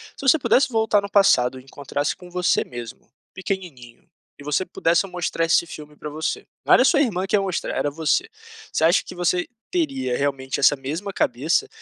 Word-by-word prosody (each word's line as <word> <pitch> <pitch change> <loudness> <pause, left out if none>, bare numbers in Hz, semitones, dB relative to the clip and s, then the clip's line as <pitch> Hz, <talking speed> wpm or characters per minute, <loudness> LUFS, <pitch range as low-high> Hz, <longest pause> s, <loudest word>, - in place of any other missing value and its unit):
se - - -11
você 275 +3 +4
pudesse 265 +1 +3
voltar 220 -3 +2
no 200 - -6
passado 130 -11 +4
e - - -15
encontrasse 140 +2 -3
com 180 - -14
você 180 -1 +1
mesmo, 120 -1 -10 0.2
pequenininho, 170 -12 -6 0.3
e - - -11
você 150 +6 0
pudesse 170 +1 +1
mostrar 175 -2 -2
esse 170 +1 +3
filme 150 -1 -10
pra 150 - -7
você, 155 +2 -4 0.2
não - - +5
era - - +6
sua 290 -4 +4
irmã 195 -8 0
que 195 - +1
ia 205 - +3
mostrar, 190 -3 -3
era 145 - 0
você, 160 - 0 0.4
você - - -1
acha 170 +4 +4
que - - -10
você 175 0 0 0.2
teria 275 - -1
realmente 135 -1 -2
essa 145 - +5
mesma 155 +9 -5
cabeça, 155 - 0
170 Hz, 195 wpm, -22 LUFS, 145-195 Hz, 0.4 s, era